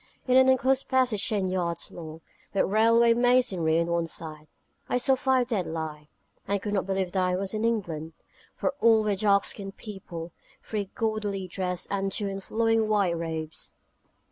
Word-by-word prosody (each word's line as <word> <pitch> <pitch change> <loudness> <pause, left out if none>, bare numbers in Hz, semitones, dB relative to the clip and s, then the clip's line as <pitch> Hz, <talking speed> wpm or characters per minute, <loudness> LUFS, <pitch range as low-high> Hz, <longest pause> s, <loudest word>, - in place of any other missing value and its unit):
In 255 - +3
an 260 0 +7
enclosed 260 +1 +2
passage 255 -6 +2
ten 200 -3 0
yards 175 -2 -2
long, 160 -1 -9 0.3
with - - +4
railway 230 +3 +4
masonry 235 -10 +3
on 170 - +1
one 170 0 0
side, 155 -1 -8 0.4
I - - +2
saw 250 +2 +3
five 260 -1 +2
dead 200 -7 -1
lie, 155 -2 -5 0.4
and 200 0 0
could 205 +1 -4
not 195 -2 0
believe 190 -2 -1
that 185 -1 +1
I 180 0 +1
was 190 +2 -2
in 215 0 -2
England, 170 -9 -2 0.4
for - - -1
all 225 -1 +5
were 210 -1 +1
dark 200 0 +3
skinned 195 -1 -5
people, 175 -5 -8 0.3
three 205 -3 -3
gaudily 210 -4 -2
dressed, 180 -1 -3
and 195 -1 -1
two 205 +1 -2
in 195 0 -4
flowing 225 +1 +1
white 200 -5 +2
robes. 160 -1 -5
195 Hz, 175 wpm, -27 LUFS, 170-225 Hz, 0.4 s, an